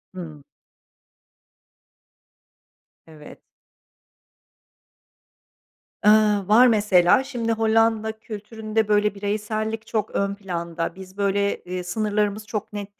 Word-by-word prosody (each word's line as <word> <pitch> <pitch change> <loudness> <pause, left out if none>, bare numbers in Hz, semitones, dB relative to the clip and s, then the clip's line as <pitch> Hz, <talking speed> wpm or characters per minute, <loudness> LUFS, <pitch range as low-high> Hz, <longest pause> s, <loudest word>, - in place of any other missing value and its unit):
Hımm. 155 -6 -9 2.6
Evet. 155 -2 -14 2.6
Iıı, 210 -2 +4
var. 235 +4 +6
Mesela, 205 0 +4
şimdi, 240 -4 -3
Hollanda 225 0 +2
kültüründe 220 0 -3
böyle 210 0 +2
bireysellik 215 +2 -3
çok 215 -1 -2
ön 200 0 0
planda. 170 -4 -4
Biz 190 +1 -12
böyle, 200 0 0
iii, 180 0 -4
sınırlarımız 210 +2 -1
çok 215 -1 -5
net 205 0 -8
210 Hz, 90 wpm, -23 LUFS, 195-220 Hz, 2.6 s, var